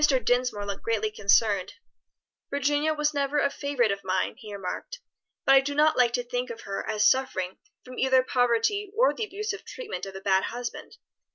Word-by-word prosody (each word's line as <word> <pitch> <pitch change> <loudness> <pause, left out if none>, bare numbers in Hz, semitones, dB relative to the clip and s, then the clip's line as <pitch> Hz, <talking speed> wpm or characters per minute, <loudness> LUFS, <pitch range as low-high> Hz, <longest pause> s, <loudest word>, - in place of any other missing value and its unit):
Dinsmore 245 -4 +1
looked 200 -1 -5
greatly 220 -2 -1
concerned. 200 -1 +2 0.8
"Virginia 290 +2 +1
was 300 0 0
never 285 0 0
a 280 -1 +2
favorite 275 -7 0
of 200 0 -4
mine," 185 0 0
he 220 -3 -11
remarked, 200 - -6 0.5
"but 270 - +6
I 270 - +8
do 285 +1 -4
not 305 +1 +4
like 245 -2 +3
to 245 - 0
think 245 +1 -3
of 230 - -7
her 195 - -4
as 210 -1 +3
suffering 190 -8 0 0.3
from 255 0 -9
either 260 0 +4
poverty 250 - +1
or - - +4
the 445 - -3
abusive 420 +1 -5
treatment 460 - -6
of 195 - -9
a - - -5
bad 190 -1 +2
husband. 240 +1 -6
245 Hz, 185 wpm, -27 LUFS, 210-285 Hz, 0.8 s, I